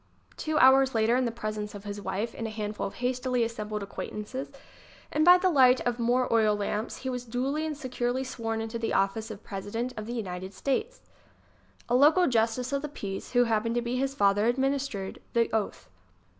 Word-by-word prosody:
Two 310 0 -2
hours 265 -1 +6
later, 225 +2 +3
in 255 0 +2
the 235 - -1
presence 215 -2 -5
of 200 - -8
his 205 0 -6
wife 215 +4 -3
and 225 - -4
a - - -4
handful 210 -2 -3
of - - -10
hastily 250 0 0
assembled 215 -2 -4
acquaintances, 210 +6 -6 0.6
and 305 - +2
by 355 +2 +9
the 370 0 +2
light 260 -4 +6
of 245 0 -1
more 245 +2 +2
oil 215 -2 +4
lamps, 210 +2 -3
he - - 0
was 250 -1 -4
duly 265 +6 -2
and 305 -2 -4
securely 250 -2 -2
sworn 225 -3 -3
into 225 +1 -4
the 225 - -1
office 195 +3 0
of 215 -1 -9
President 220 +5 -4
of 215 0 -6
the 240 - -4
United 190 -3 -5
States. 435 - -2 0.9
A 240 - -1
local 300 +8 +6
justice 240 +1 +1
of 280 - 0
the 300 - -4
peace, 200 -8 -6
who 245 0 +5
happened 230 0 0
to 240 - +1
be 240 +1 -2
his 270 +1 -1
father, 205 -1 +3
administered 265 -5 -1
the 230 -1 +1
oath. 210 - -2
235 Hz, 200 wpm, -28 LUFS, 215-260 Hz, 0.9 s, by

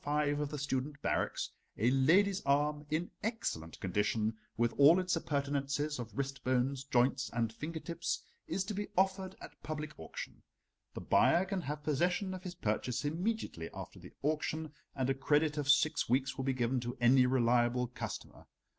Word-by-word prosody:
5 145 0 +1
of 150 -1 -1
the 150 - -4
student 145 0 -2
barracks, - - 0 0.3
a 120 +4 +3
lady's 185 +9 +4
arm 150 +1 +1
in 160 +3 -1
excellent 190 - -3
condition, 105 +3 0 0.2
with 120 0 +2
all 155 +6 +8
its 185 -1 +1
appurtenances 140 -1 -1
of 115 -3 -7
wrist 140 0 -3
bones, 130 +1 +1
joints, 130 0 +2
and 115 -1 0
finger 160 +7 -5
tips, 170 +1 -3 0.2
is 190 - -1
to 205 +2 -4
be 205 +1 -3
offered 190 0 +1
at - - -12
public 155 0 -5
auction. 80 - -7 0.5
The - - -5
buyer 175 +2 +4
can 190 -1 -2
have 150 0 -5
possession 175 +6 +1
of 185 - -6
his 180 -1 -7
purchase 120 0 -1
immediately 165 - -2
after - - -8
the - - -13
auction, 155 +1 -1 0.2
and 130 -2 0
a 135 - +3
credit 145 +3 +2
of 145 -1 -2
six 155 -1 +4
weeks 130 +2 +1
will 135 - -3
be 135 - +2
given 125 +1 0
to 120 0 -5
any 125 +1 +6
reliable 125 -1 +3
customer. 125 - -7
145 Hz, 175 wpm, -33 LUFS, 125-160 Hz, 0.5 s, all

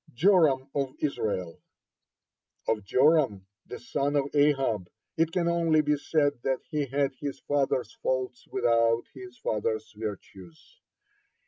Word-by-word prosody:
(52) - - -30
JORAM 155 -6 +4
OF 135 -2 -2
ISRAEL 100 - -2 1.1
Of 110 -2 0
Joram, 130 - +3 0.2
the - - -7
son 145 +1 -2
of 140 -1 0
Ahab, 135 -10 +2 0.3
it 165 0 +1
can 170 0 0
only 165 -2 +3
be 150 0 +1
said 145 0 +1
that 130 +1 0
he 150 -3 -2
had 140 +1 0
his 140 -2 -5
father's 135 -3 0
faults 130 -1 -2
without 115 0 +2
his 125 -2 -11
father's 110 0 -2
virtues. 95 -5 -9
135 Hz, 130 wpm, -28 LUFS, 115-145 Hz, 1.1 s, JORAM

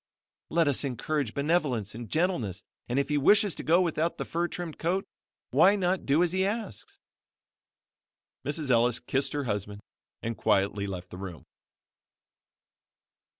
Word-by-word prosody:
Let 165 -1 +2
us 140 -1 +2
encourage 140 -1 -2
benevolence 140 - 0
and 115 0 -8
gentleness 145 - 0 0.3
and 125 - 0
if 140 - +1
he 150 -1 +2
wishes 205 +5 +5
to - - -7
go 170 +3 +4
without 165 0 -1
the - - -3
fur 170 +1 -1
trimmed 175 -3 -6
coat, 185 +4 0 0.5
why 195 +3 +6
not 185 -1 0
do 145 +5 +4
as 175 - +1
he 190 +1 +1
asks?" 200 - -4 1.5
Mrs. 145 -1 -1
Ellis 120 0 +3
kissed 135 +1 -1
her 145 -1 -1
husband 105 -3 -3 0.4
and 115 0 -2
quietly 100 -1 +1
left 90 -2 -6
the 90 - -8
room. 90 -4 -8
145 Hz, 150 wpm, -28 LUFS, 110-175 Hz, 1.5 s, why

